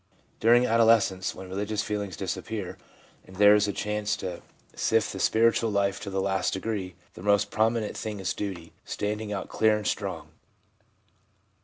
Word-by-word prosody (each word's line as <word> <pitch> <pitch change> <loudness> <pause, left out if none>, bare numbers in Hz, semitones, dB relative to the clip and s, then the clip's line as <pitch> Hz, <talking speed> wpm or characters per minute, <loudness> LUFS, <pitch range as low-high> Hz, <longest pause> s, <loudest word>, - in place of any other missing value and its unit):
During 120 +2 +5
adolescence, 115 -5 +3
when 95 - -9
religious 105 +3 -2
feelings 100 -5 -4
disappear, 105 0 -4 0.5
and 95 - -13
there 105 +1 +7
is 105 0 +3
a - - 0
chance 105 +1 -2
to 90 -2 -5 0.3
sift 110 -1 +1
the 95 - -6
spiritual 115 +2 +3
life 100 -1 0
to - - -6
the 95 0 -2
last 95 -1 0
degree, 95 -3 -3 0.2
the - - -11
most 100 +1 +2
pro 110 +1 +3
minent 115 -2 -3
thing 105 -2 -5
is 95 - -1
duty, 90 -5 -6
standing 105 +1 -3
out 100 -2 -3
clear 110 -1 +2
and 105 - -6
strong. - - -3
105 Hz, 165 wpm, -27 LUFS, 95-110 Hz, 0.5 s, there